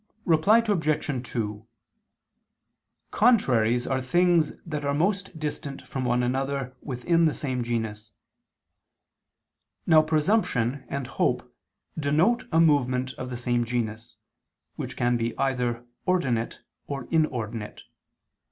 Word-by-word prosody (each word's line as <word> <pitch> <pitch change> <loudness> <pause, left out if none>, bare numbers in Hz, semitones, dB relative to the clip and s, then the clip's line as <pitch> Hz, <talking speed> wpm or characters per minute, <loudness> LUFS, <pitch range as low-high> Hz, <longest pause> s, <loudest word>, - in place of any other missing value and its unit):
Reply 195 +8 +4
Obj. 155 - 0
2: 105 -1 -3 1.4
Contraries 125 - +3
are 130 -1 0
things 170 +3 +3
that 150 -3 -4
are 140 0 0
most 190 +2 0
distant 145 -2 -5
from 130 -3 -4
one 125 0 +2
another 135 +1 -2
within 165 +6 +1
the 155 - +2
same 130 -3 -2
genus. 115 -2 -3 1.8
Now 160 -2 +6
presumption 150 - +1
and 140 -1 -3
hope - - -1 0.4
denote 160 - +2
a 160 - +3
movement 130 -5 +2
of 125 - -6
the 125 - -4
same 120 0 0
genus, 115 -1 -4 0.6
which - - -6
can 120 0 +2
be 115 0 -2
either 125 -3 -1 0.2
ordinate 130 -11 0 0.3
or 135 -3 -4
inordinate. 120 -9 -1
135 Hz, 115 wpm, -26 LUFS, 120-155 Hz, 1.8 s, Now